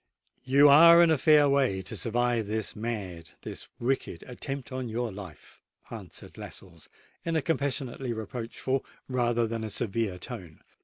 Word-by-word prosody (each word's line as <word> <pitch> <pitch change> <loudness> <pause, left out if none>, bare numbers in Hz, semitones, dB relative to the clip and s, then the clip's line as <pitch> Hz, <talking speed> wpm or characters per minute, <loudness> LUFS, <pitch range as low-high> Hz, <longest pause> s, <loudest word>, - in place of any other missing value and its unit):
"You 140 +3 +6
are 170 +4 +9
in 165 - +4
a 160 - +3
fair 150 0 +6
way 130 -9 +1
to 100 +4 -6
survive 115 +2 0
this 110 0 -2
mad—this 100 -7 -6
wicked 120 -8 -2
attempt 135 +2 -6
upon 130 -2 -4
your 115 +1 -2
life," 100 -1 -11 0.3
answered - - -9
Lascelles, 85 -5 -11 0.3
in 165 - -2
a 160 - +2
compassionately 135 -4 -2
reproachful 115 +4 -3 0.2
rather 120 -2 +1
than 115 0 -4
a 110 - -4
severe 105 -2 -2
tone. 85 -2 -9
120 Hz, 145 wpm, -28 LUFS, 105-135 Hz, 0.3 s, are